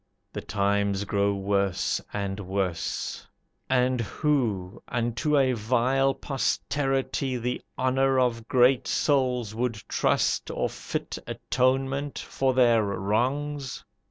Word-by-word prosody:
The - - -4
times 100 -1 0
grow 100 0 +1
worse 100 -1 0
and 100 -1 -3
worse; 95 -3 -3 0.4
And 125 -1 +2
who, 115 - -1
unto 120 +5 0
a 130 -2 +3
vile 125 +4 +2
posterity, 135 -1 -1
The 125 +1 -2 0.2
honor 130 +1 +2
of 120 -2 0
great 125 0 +4
souls 125 -6 +1
would 120 +1 -1
trust, - - +1
Or - - -1
fit - - -5
atonement 135 +2 0
for 130 -1 -1
their 120 -3 +5
wrongs? 125 +9 -1
125 Hz, 105 wpm, -26 LUFS, 100-135 Hz, 0.4 s, their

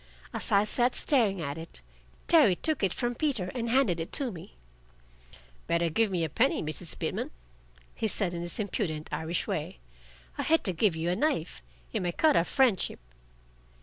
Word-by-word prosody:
As - - -2
I 200 0 +5
sat 245 +3 +2
staring 215 - +1
at 140 +1 -4
it, 165 - -8 0.4
Terry 295 - +6
took 315 - 0
it 195 -3 +2
from 240 +4 -1
Peter 240 -9 -1
and 235 -2 -2
handed 230 -9 +2
it 165 - -5
to 270 -4 +1
me. 160 - -11 1.1
"Better 170 0 +1
give 225 +6 +2
me 180 -3 -1
a - - +1
penny, 240 - +1
Mrs. 155 +2 -3
Pitman," - - -3 0.6
he 220 - -2
said 195 -4 +1
in 170 - -4
his 175 0 -4
impudent 180 -7 -3
Irish 165 +2 -1
way. - - -3 0.6
"I - - +2
hate 325 +1 +2
to 185 - 0
give 175 +1 +2
you 165 +2 -1
a - - +1
knife. 185 - -1 0.3
It - - 0
may 175 -1 -2
cut 310 - +3
our 170 - +4
friendship." 245 -7 +1
190 Hz, 180 wpm, -29 LUFS, 170-245 Hz, 1.1 s, Terry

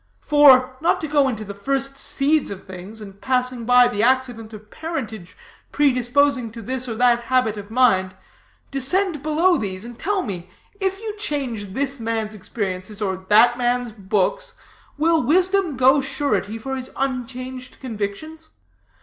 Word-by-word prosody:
For, 260 -3 +5
not 330 - +2
to 315 - -3
go 290 -2 +3
into 220 -4 -3
the 200 - -7
first 270 +6 -2
seeds 285 +2 +1
of 195 -1 -8
things, 190 +4 -9
and 200 -1 -11
passing 250 -2 0
by 245 0 +6
the 205 -3 -2
accident 245 -2 +1
of 215 -1 -12
parentage 225 - -6 0.3
predisposing 265 -2 +2
to 230 -1 -8
this 255 +3 -3
or 225 - -3
that 240 0 +3
habit 250 -4 +1
of 205 -1 -9
mind, 215 -6 +2 0.6
descend 305 +4 +1
below 325 +4 +2
these, 190 0 -4
and 240 0 -10
tell 395 +1 0
me, 180 -4 -6 0.3
if 385 -1 -1
you 435 -1 -5
change 250 - -3
this 275 -1 -2
man's 225 -1 -2
experiences 195 -1 -5
or 190 -2 -3
that 240 +4 +5
man's 245 -1 0
books, 210 - -1 0.4
will 325 +1 +3
wisdom 360 +2 +2
go 265 +2 +5
surety 265 -6 -1
for 265 +4 -5
his 260 -1 -4
unchanged 255 -1 -4
convictions? 260 +8 -6
250 Hz, 155 wpm, -22 LUFS, 215-280 Hz, 0.6 s, by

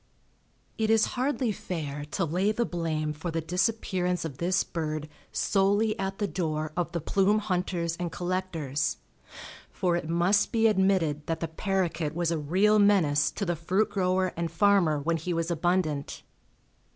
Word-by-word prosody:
It 220 -1 +1
is 220 -1 +5
hardly 255 -2 0
fair 150 -7 -5
to 170 +5 -2
lay 180 +6 +1
the 235 +2 0
blame 155 -4 -2
for 160 +4 -5
the 165 0 -1
disappearance 180 0 -1
of 140 -5 -7
this 175 +2 +2
bird 155 -2 -4 0.2
solely 205 +2 +2
at 195 0 -2
the 205 - 0
door 155 -5 -2
of 175 -1 -1
the 170 - -2
plume 200 +6 +2
hunters 180 -4 -1
and 175 -1 -3
collectors, 175 -6 -2 0.7
for 180 -2 0
it 170 -2 -3
must 175 +5 +2
be 225 -1 +2
admitted 190 -8 +2
that 165 0 -1
the 165 - -2
paroquet 165 -2 -1
was 170 -1 0
a 165 - 0
real 195 +8 +3
menace 185 -8 +4
to 200 - -4
the 175 -1 0
fruit 185 +6 0
grower 185 -1 +1
and 170 0 -2
farmer 180 -3 +3
when 165 +3 0
he 170 +2 -3
was 165 +1 -1
abundant. 165 -4 -1
175 Hz, 165 wpm, -28 LUFS, 160-195 Hz, 0.7 s, is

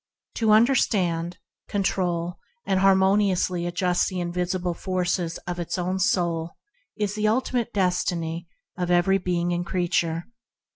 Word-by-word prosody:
To 225 -2 +1
understand, 190 -7 +3 0.3
control, 180 -3 -1 0.3
and 190 - +1
adjust 195 - +2
harmoniously 190 -2 +3
the 180 +1 0
invisible 180 0 -1
forces 180 -1 -1
of 175 0 -4
its 175 +2 -3
own 185 +1 -1
soul 170 -3 0 0.4
is 205 -2 -1
the 215 0 0
ultimate 240 +1 0
destiny 175 -3 -1 0.3
of 180 -1 -2
every 180 +2 +3
being 175 -1 -1
and 175 0 -1
creature. 170 -2 0
180 Hz, 125 wpm, -25 LUFS, 175-195 Hz, 0.4 s, understand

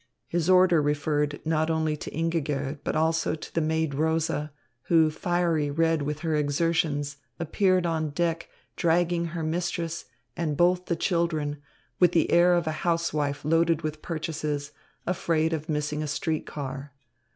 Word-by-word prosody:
His 175 0 -1
order 180 -3 +6
referred 145 0 0
not 160 0 +1
only 160 -1 +1
to - - -7
Ingigerd, 150 -3 -2
but - - -2
also 160 +1 +1
to 155 - -10
the 165 - +1
maid 160 -1 0
Rosa, 155 0 0 0.3
who, 160 -2 +4
fiery 170 -2 0
red 165 +1 +1
with 150 +1 -3
her 165 -2 -1
exertions, 145 -1 0 0.2
appeared 185 +2 +2
on 160 -2 0
deck 170 +2 -1 0.3
dragging 170 0 +2
her 165 0 -4
mistress 170 0 -2 0.3
and 155 -4 -2
both 180 +1 +3
the 170 - +1
children, 160 -4 -1 0.4
with 180 -1 +5
the 165 - +2
air 175 +1 +6
of 175 -1 +1
a 160 - 0
housewife 150 -4 0
loaded 165 +1 +2
with 155 0 -4
purchases, 155 -3 -3 0.3
afraid 165 -3 +1
of 155 +1 -4
missing 150 0 -1
a 155 - -2
street 155 +2 -2
car. 140 -1 -6
160 Hz, 150 wpm, -27 LUFS, 150-170 Hz, 0.4 s, order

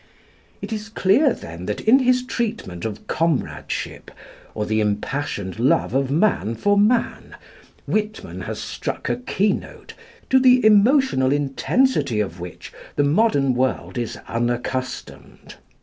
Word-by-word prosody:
" - - -34
It - - -4
is 215 0 -5
clear, 220 +7 +3
then, 85 - -7
that 105 - -2
in 240 +5 +5
his 255 -1 +2
treatment 220 - -4
of 110 -2 -5
comradeship, 165 -3 -2 0.5
or 105 - -2
the 110 +1 0
impassioned 105 -1 -3
love 125 0 +2
of 135 0 +1
man 145 - +1
for 205 - +2
man, 220 +4 +1 0.5
Whitman 210 - -3
has - - -5
struck - - -4
a 120 - 0
keynote, 190 +11 -2 0.4
to 260 - +6
the 255 -2 +5
emotional 215 - +4
intensity 145 - +1
of 95 -4 -3
which 90 0 -9 0.2
the 145 - +2
modern 145 - +2
world 130 +1 -1
is 120 - -4
unaccustomed. 120 +2 -4
145 Hz, 135 wpm, -22 LUFS, -, 0.5 s, to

